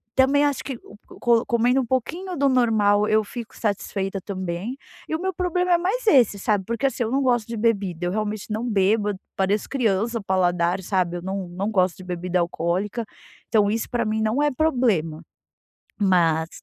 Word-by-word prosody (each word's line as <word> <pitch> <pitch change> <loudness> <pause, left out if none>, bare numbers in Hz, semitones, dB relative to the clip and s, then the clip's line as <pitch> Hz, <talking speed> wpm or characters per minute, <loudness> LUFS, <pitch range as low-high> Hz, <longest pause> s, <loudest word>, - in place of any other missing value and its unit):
também 275 +2 +4
acho 285 -2 -1
que 265 -3 -5
o - - -14 0.2
co 235 -1 +3
comendo 245 +1 +2
um - - -3
pouquinho 335 +10 -2
do 280 0 +3
normal 215 -5 +3
eu 215 0 +3
fico 230 +2 -8
satisfeita 195 -2 -2
também, 190 +5 -4 0.3
e - - -2
o - - -3
meu 380 +1 -1
problema 360 +1 0
é - - +5
mais 395 +9 -1
esse, 250 - +5
sabe, 200 -1 0
porque 235 +5 -2
assim, 265 -2 0
eu 225 - -3
não 270 +2 +1
gosto 240 -4 +1
de 230 - -5
bebida 200 -6 0
eu 175 - -1
realmente 215 +1 -3
não 225 +3 -2
bebo 205 +1 +2 0.3
pareço 195 +2 0
criança 230 -2 0
paladar 180 -1 +1
sabe 175 -2 0
eu - - -7
não 190 0 -4
não 190 +5 -3
gosto 185 -4 +1
de 185 - -10
bebida 180 0 -2
alcoólica, 175 +6 -1 0.5
então 210 -2 +3
isso 225 +1 -2
pra 240 -1 0
mim 215 0 -1
não 220 +6 +1
é 295 - +3
problema. 230 - 0 0.8
Mas, 165 -4 +2
215 Hz, 190 wpm, -23 LUFS, 190-250 Hz, 0.8 s, é